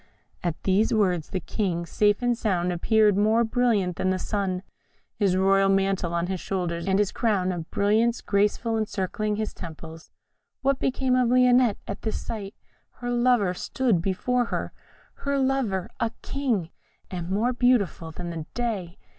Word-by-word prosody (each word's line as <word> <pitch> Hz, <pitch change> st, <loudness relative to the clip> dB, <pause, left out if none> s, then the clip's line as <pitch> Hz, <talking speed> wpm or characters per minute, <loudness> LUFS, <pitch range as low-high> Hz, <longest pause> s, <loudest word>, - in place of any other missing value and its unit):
At 170 Hz, -4 st, -3 dB
these 195 Hz, +3 st, +2 dB
words 180 Hz, -7 st, +1 dB
the 190 Hz, -, -2 dB
King, 180 Hz, -3 st, -2 dB
safe 205 Hz, +6 st, +1 dB
and 245 Hz, 0 st, +2 dB
sound, 180 Hz, -6 st, 0 dB
appeared 210 Hz, +3 st, +3 dB
more 215 Hz, +3 st, +3 dB
brilliant 220 Hz, -6 st, +1 dB
than 185 Hz, -, 0 dB
the 185 Hz, -, +1 dB
sun, 190 Hz, -2 st, -2 dB, 0.5 s
his 195 Hz, -3 st, +1 dB
royal 195 Hz, +1 st, +4 dB
mantle 195 Hz, -2 st, +1 dB
on 170 Hz, 0 st, 0 dB
his 185 Hz, 0 st, -3 dB
shoulders, 175 Hz, -2 st, -3 dB
and 190 Hz, 0 st, +3 dB
his 205 Hz, -1 st, +1 dB
crown 200 Hz, -5 st, +1 dB
of 170 Hz, -2 st, -5 dB
brilliants 220 Hz, +4 st, +2 dB
gracefully 210 Hz, +3 st, +1 dB
encircling 210 Hz, 0 st, -2 dB
his 215 Hz, 0 st, -3 dB
temples. 160 Hz, -1 st, -10 dB, 0.5 s
What 275 Hz, 0 st, +2 dB
became 260 Hz, -1 st, +1 dB
of 250 Hz, -2 st, +3 dB
Lionette 250 Hz, -3 st, +4 dB
at 200 Hz, -, -5 dB
this 220 Hz, -, -2 dB
sight? 205 Hz, -2 st, -6 dB, 0.4 s
Her 245 Hz, 0 st, -5 dB
lover 240 Hz, -6 st, +3 dB
stood 220 Hz, -1 st, 0 dB
before 240 Hz, +7 st, 0 dB
her -, -, -4 dB, 0.4 s
her 280 Hz, 0 st, -1 dB
lover 260 Hz, -9 st, 0 dB
a 230 Hz, -, +1 dB
king, 230 Hz, -, -1 dB, 0.4 s
and 175 Hz, -2 st, -4 dB
more 220 Hz, +6 st, +1 dB
beautiful 240 Hz, -10 st, +1 dB
than 175 Hz, +2 st, -6 dB
the 160 Hz, -2 st, -6 dB
day! 210 Hz, -7 st, -3 dB
200 Hz, 160 wpm, -25 LUFS, 180-235 Hz, 0.5 s, royal